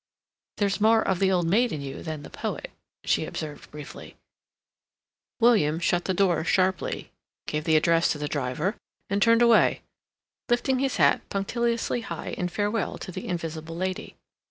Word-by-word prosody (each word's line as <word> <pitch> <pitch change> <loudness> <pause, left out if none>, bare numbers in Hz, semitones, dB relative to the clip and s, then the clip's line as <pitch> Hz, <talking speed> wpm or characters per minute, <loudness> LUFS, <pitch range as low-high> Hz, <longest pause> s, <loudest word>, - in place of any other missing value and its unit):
"There's 200 0 0
more 220 +1 +5
of 190 -2 +1
the 190 -1 +3
old 180 -2 +2
maid 225 +8 +3
in 155 - -3
you 140 -1 -6
than 155 -3 -5
the - - -11
poet," - - -5 0.3
she - - +1
observed 150 -2 -6
briefly. 150 -1 -10 1.2
William 205 -10 +4
shut 175 0 +1
the 190 - 0
door 175 -4 +2
sharply, 185 0 0 0.3
gave 150 +1 -3
the 160 -2 +3
address 165 +2 +3
to - - -7
the 150 0 -3
driver, 145 - -2 0.4
and 200 +1 +1
turned 230 +1 +5
away, 235 -1 +4 0.7
lifting 255 +2 +2
his 270 -1 0
hat 140 -5 +4
punctiliously 235 +4 -1
high - - -6
in 180 - -2
farewell 205 +2 -1
to - - -7
the 185 - -6
invisible 165 -2 -4
lady. 185 +1 -4
185 Hz, 160 wpm, -26 LUFS, 160-215 Hz, 1.2 s, more